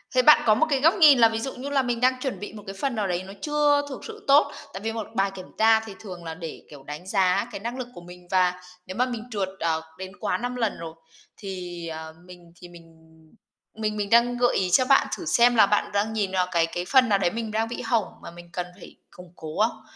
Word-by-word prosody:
Thế 255 Hz, -, +6 dB
bạn 300 Hz, +4 st, +7 dB
có 215 Hz, -2 st, +5 dB
một 275 Hz, -, +3 dB
cái 275 Hz, -3 st, +1 dB
góc 325 Hz, +4 st, +5 dB
nhìn 300 Hz, -8 st, +7 dB
là 230 Hz, -1 st, +7 dB
ví 225 Hz, 0 st, -3 dB
dụ 270 Hz, +3 st, -4 dB
như 270 Hz, +3 st, -6 dB
là 280 Hz, -1 st, +2 dB
mình 245 Hz, -2 st, -2 dB
đang 255 Hz, 0 st, +3 dB
chuẩn 255 Hz, -9 st, -3 dB
bị 205 Hz, -, -7 dB
một 210 Hz, -1 st, -10 dB
cái 195 Hz, -, -5 dB
phần 270 Hz, 0 st, -1 dB
nào 210 Hz, -3 st, -1 dB
đấy 180 Hz, 0 st, -2 dB
nó 190 Hz, +1 st, -10 dB
chưa 295 Hz, -1 st, +2 dB
thực 265 Hz, -, -8 dB
sự 435 Hz, -2 st, -10 dB
tốt. 280 Hz, +2 st, +5 dB, 0.2 s
Tại 190 Hz, -, -7 dB
vì 225 Hz, +1 st, -2 dB
một 225 Hz, -2 st, -5 dB
bài 195 Hz, 0 st, +1 dB
kiểm 185 Hz, -1 st, -9 dB
tra 220 Hz, 0 st, +5 dB
thì 220 Hz, -3 st, -10 dB
thường 180 Hz, -5 st, -9 dB
là 165 Hz, -1 st, -5 dB
để, 165 Hz, -1 st, -8 dB
kiểu, 145 Hz, -3 st, -13 dB
đánh 150 Hz, +6 st, -8 dB
giá 190 Hz, +2 st, +2 dB
cái 210 Hz, -, -6 dB
năng 235 Hz, +5 st, -5 dB
lực 255 Hz, -2 st, -5 dB
của 175 Hz, -, -11 dB
mình 180 Hz, 0 st, -14 dB
và 180 Hz, -1 st, +2 dB, 0.2 s
nếu 185 Hz, -, -8 dB
mà 250 Hz, -, +3 dB
mình 240 Hz, -3 st, -5 dB
trượt, 200 Hz, -3 st, -2 dB
ờ, 160 Hz, -1 st, 0 dB, 0.2 s
đến 190 Hz, 0 st, -7 dB
quá -, -, -1 dB
5 245 Hz, +1 st, -4 dB
lần 225 Hz, -4 st, -1 dB
rồi, 165 Hz, -1 st, -7 dB, 0.4 s
thì, 180 Hz, -3 st, -7 dB
ờ, 160 Hz, 0 st, -7 dB
mình 175 Hz, -2 st, -15 dB
thì 175 Hz, -, -12 dB
mình 170 Hz, -1 st, -15 dB, 0.8 s
mình 215 Hz, -1 st, -2 dB
mình 205 Hz, -1 st, -2 dB
đang 235 Hz, +2 st, +4 dB
gợi 245 Hz, 0 st, +2 dB
ý 185 Hz, -1 st, 0 dB
cho 255 Hz, +8 st, +4 dB
bạn 270 Hz, +1 st, +4 dB
thử 355 Hz, -, -8 dB
xem 245 Hz, -4 st, +4 dB
là 220 Hz, -, +7 dB
bạn 205 Hz, +1 st, 0 dB
đang 205 Hz, +2 st, 0 dB
nhìn 205 Hz, -3 st, -1 dB
vào 185 Hz, -1 st, +1 dB
cái 170 Hz, -2 st, +3 dB
cái 175 Hz, +1 st, -4 dB
phần 255 Hz, +2 st, +4 dB
nào 200 Hz, -2 st, +3 dB
đấy 175 Hz, -3 st, +1 dB
mình 225 Hz, -1 st, -4 dB
đang 220 Hz, +1 st, 0 dB
bị 240 Hz, -, -5 dB
hỏng 225 Hz, -2 st, -1 dB
mà -, -, -9 dB
mình 175 Hz, 0 st, -13 dB
cần 180 Hz, -, -3 dB
phải -, -, -13 dB, 0.2 s
củng 180 Hz, -1 st, -14 dB
cố 155 Hz, -1 st, -8 dB
không? 220 Hz, -, -11 dB
210 Hz, 270 wpm, -25 LUFS, 180-245 Hz, 0.8 s, bạn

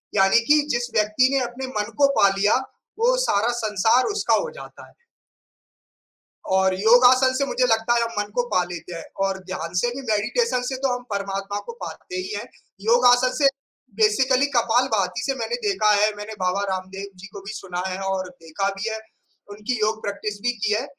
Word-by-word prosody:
यानी 195 Hz, +2 st, +5 dB
कि 300 Hz, 0 st, +6 dB
जिस 240 Hz, 0 st, -1 dB
व्यक्ति 215 Hz, +5 st, +3 dB
ने 275 Hz, -, +3 dB
अपने 245 Hz, +2 st, -6 dB
मन 210 Hz, +2 st, -3 dB
को 280 Hz, -, +7 dB
पा 200 Hz, -, +7 dB
लिया 205 Hz, +2 st, +3 dB, 0.4 s
वो -, -, +3 dB
सारा 205 Hz, +4 st, +2 dB
संसार 220 Hz, +4 st, +2 dB
उसका 420 Hz, -, +1 dB
हो -, -, -4 dB
जाता -, -, -12 dB
है। -, -, -22 dB, 1.6 s
और 190 Hz, 0 st, +3 dB
योगासन 250 Hz, +4 st, +5 dB
से 280 Hz, +1 st, +1 dB
मुझे 255 Hz, -2 st, +1 dB
लगता 225 Hz, 0 st, +2 dB
है 235 Hz, -, +2 dB
हम 230 Hz, -, -1 dB
मन 205 Hz, -, -6 dB
को 245 Hz, -, +2 dB
पा 180 Hz, -, +1 dB
लेते 170 Hz, 0 st, -7 dB
हैं 165 Hz, -, -7 dB, 0.2 s
और 195 Hz, 0 st, -2 dB
ध्यान 175 Hz, -2 st, -5 dB
से 240 Hz, -, +1 dB
भी 275 Hz, -, -5 dB
मेडिटेशन 245 Hz, -, 0 dB
से 260 Hz, +1 st, -3 dB
तो 265 Hz, -2 st, +2 dB
हम 245 Hz, -, -7 dB
परमात्मा 200 Hz, 0 st, -3 dB
को -, -, -4 dB
पाते 370 Hz, -, -8 dB
ही 370 Hz, +2 st, -4 dB
हैं। -, -, -5 dB, 0.4 s
योग 235 Hz, +4 st, +3 dB
आसन 250 Hz, +1 st, +4 dB
से 285 Hz, -, +5 dB, 0.5 s
बेसिकली 255 Hz, +5 st, +3 dB
कपालभाति 225 Hz, -6 st, +1 dB
से 270 Hz, -, -1 dB
मैंने 475 Hz, -, -2 dB
देखा 375 Hz, -, +2 dB
है, 210 Hz, +1 st, +2 dB
मैंने 210 Hz, +1 st, -7 dB
बाबा 185 Hz, +2 st, 0 dB
रामदेव 190 Hz, +1 st, -7 dB
जी 185 Hz, +2 st, -11 dB
को 200 Hz, -, -8 dB
भी 200 Hz, +2 st, -8 dB
सुना 180 Hz, -3 st, -5 dB
है 185 Hz, 0 st, -4 dB
और 195 Hz, -1 st, -2 dB
देखा 180 Hz, +2 st, -4 dB
भी 205 Hz, +4 st, -3 dB
है। 220 Hz, -, -3 dB, 0.5 s
उनकी 210 Hz, +4 st, -3 dB
योग 215 Hz, +1 st, 0 dB
प्रैक्टिस 205 Hz, +1 st, -4 dB
भी 245 Hz, -, +2 dB
की 215 Hz, -3 st, -1 dB
है 225 Hz, +5 st, -1 dB
215 Hz, 195 wpm, -23 LUFS, 195-250 Hz, 1.6 s, को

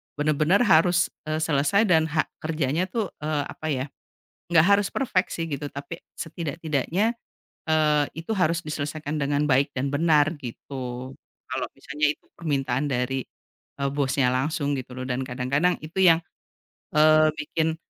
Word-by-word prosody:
benar-benar 155 Hz, +6 st, +2 dB
harus, 175 Hz, -3 st, +4 dB, 0.2 s
eee, 155 Hz, 0 st, -1 dB
selesai 160 Hz, +7 st, +3 dB
dan 160 Hz, -3 st, +5 dB
ha 160 Hz, 0 st, +1 dB, 0.2 s
kerjanya 155 Hz, +1 st, -1 dB
tuh, 205 Hz, 0 st, -2 dB
eee, 150 Hz, -1 st, -1 dB
apa 155 Hz, -, -6 dB
ya, 130 Hz, -2 st, -1 dB, 0.7 s
nggak 160 Hz, -2 st, +6 dB
harus 200 Hz, +1 st, +4 dB
perfect 205 Hz, -9 st, +1 dB
sih 165 Hz, -, -2 dB
gitu, 145 Hz, 0 st, -3 dB
tapi 145 Hz, +4 st, -7 dB, 0.2 s
setidak-tidaknya, 165 Hz, -, -1 dB, 0.5 s
eee, 155 Hz, -2 st, +3 dB
itu 165 Hz, +5 st, -8 dB
harus 165 Hz, -2 st, +2 dB
diselesaikan 155 Hz, -1 st, -4 dB
dengan 145 Hz, 0 st, +1 dB
baik 135 Hz, +1 st, +3 dB
dan 135 Hz, +2 st, -1 dB
benar 155 Hz, +1 st, +3 dB
gitu. 130 Hz, 0 st, -7 dB, 0.4 s
Kalau -, -, -2 dB
misalnya 150 Hz, +2 st, -1 dB
itu -, -, -25 dB
permintaan 135 Hz, -5 st, -1 dB
dari, 130 Hz, +1 st, -1 dB, 0.6 s
eee, 140 Hz, 0 st, 0 dB
bosnya 135 Hz, -2 st, +1 dB
langsung 145 Hz, +3 st, 0 dB
gitu 125 Hz, 0 st, -9 dB
loh 130 Hz, -, -5 dB
dan 125 Hz, +1 st, -1 dB
kadang-kadang 140 Hz, +8 st, +1 dB
itu 155 Hz, +4 st, -10 dB
yang, 165 Hz, -3 st, +7 dB, 0.8 s
eee, 155 Hz, 0 st, +6 dB
bikin, 160 Hz, +1 st, -1 dB
150 Hz, 145 wpm, -25 LUFS, 140-165 Hz, 0.8 s, yang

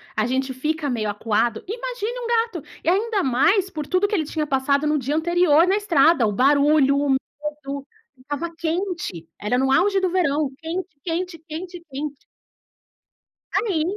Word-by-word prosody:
a 215 Hz, -, +1 dB
gente 260 Hz, +2 st, -1 dB
fica 300 Hz, +2 st, -2 dB
meio 220 Hz, -4 st, -1 dB
acuado, 220 Hz, +2 st, 0 dB
imagine 485 Hz, +1 st, -4 dB
um 475 Hz, -, -4 dB
gato. 455 Hz, -, 0 dB, 0.2 s
E 330 Hz, -, +2 dB
ainda 410 Hz, +2 st, +1 dB
mais 340 Hz, -, +3 dB
por 305 Hz, -5 st, -5 dB
tudo 370 Hz, +3 st, +2 dB
que 420 Hz, -, -1 dB
ele 315 Hz, -, 0 dB
tinha 305 Hz, 0 st, -2 dB
passado 280 Hz, +1 st, +1 dB
no 300 Hz, -, +2 dB
dia 275 Hz, +3 st, -2 dB
anterior, 340 Hz, 0 st, +4 dB
na 385 Hz, -, +3 dB
estrada, 325 Hz, -, +4 dB
o 210 Hz, -, 0 dB
barulho, 280 Hz, +3 st, +4 dB
o 285 Hz, 0 st, 0 dB
medo. 280 Hz, 0 st, -3 dB, 0.3 s
Estava 290 Hz, +5 st, -4 dB
quente, 335 Hz, -, -3 dB
era 210 Hz, +5 st, 0 dB
no 265 Hz, +1 st, +2 dB
auge 390 Hz, +7 st, +3 dB
do 375 Hz, -1 st, +1 dB
verão, 305 Hz, -5 st, +1 dB
quente, 345 Hz, +3 st, -4 dB, 0.2 s
quente, 345 Hz, 0 st, -3 dB
quente, 345 Hz, +2 st, -7 dB
quente. 290 Hz, +2 st, -4 dB, 1.4 s
Aí, 375 Hz, -9 st, +1 dB
310 Hz, 165 wpm, -23 LUFS, 270-365 Hz, 1.4 s, anterior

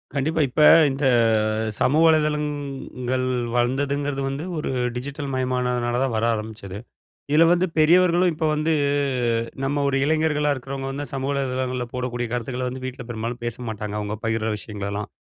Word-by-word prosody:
கண்டிப்பா. 155 Hz, +3 st, 0 dB
இப்ப 150 Hz, -, 0 dB, 0.3 s
இந்த 135 Hz, +1 st, -2 dB, 0.5 s
ஆ 110 Hz, +1 st, -1 dB
சமூக 150 Hz, +5 st, +3 dB
வலைதளங்கள் 145 Hz, -4 st, -1 dB, 0.3 s
வளர்ந்ததுங்குறது 140 Hz, +3 st, 0 dB
வந்து 135 Hz, +4 st, -4 dB
ஒரு 150 Hz, -, -3 dB, 0.3 s
டிஜிட்டல் 140 Hz, +2 st, -5 dB
மயமானதுனால 125 Hz, -1 st, 0 dB
தான் 135 Hz, -3 st, 0 dB
வர 110 Hz, -, 0 dB
ஆரம்பிச்சது. 105 Hz, -3 st, -6 dB, 0.5 s
இதுல 160 Hz, +2 st, +6 dB
வந்து 175 Hz, +1 st, +3 dB
பெரியவர்களும் 175 Hz, +2 st, +4 dB
இப்ப 160 Hz, +1 st, -2 dB
அ -, -, +1 dB
வந்து 155 Hz, +2 st, +1 dB, 0.9 s
நம்ம 145 Hz, +1 st, 0 dB
ஒரு 140 Hz, -, +1 dB
இளைஞர்களா 155 Hz, -1 st, +1 dB
இருக்குறவங்க 135 Hz, 0 st, -5 dB
வந்து 145 Hz, +2 st, -4 dB
சமூக 135 Hz, +1 st, -2 dB
வலைதளங்கள்ல 130 Hz, -2 st, -2 dB
போடக்கூடிய 125 Hz, -1 st, -3 dB
கருத்துக்கள 125 Hz, +1 st, -2 dB
வந்து 130 Hz, +1 st, -7 dB
வீட்ல 130 Hz, 0 st, -6 dB
பெரும்பாலும் 115 Hz, +1 st, -4 dB
பேச 120 Hz, -1 st, -3 dB
மாட்டாங்க. 105 Hz, -1 st, -5 dB
அவங்க 105 Hz, 0 st, -3 dB
பகிர்ற 115 Hz, 0 st, 0 dB
விஷயங்களெல்லாம். 100 Hz, 0 st, -5 dB
130 Hz, 145 wpm, -23 LUFS, 120-145 Hz, 0.9 s, இதுல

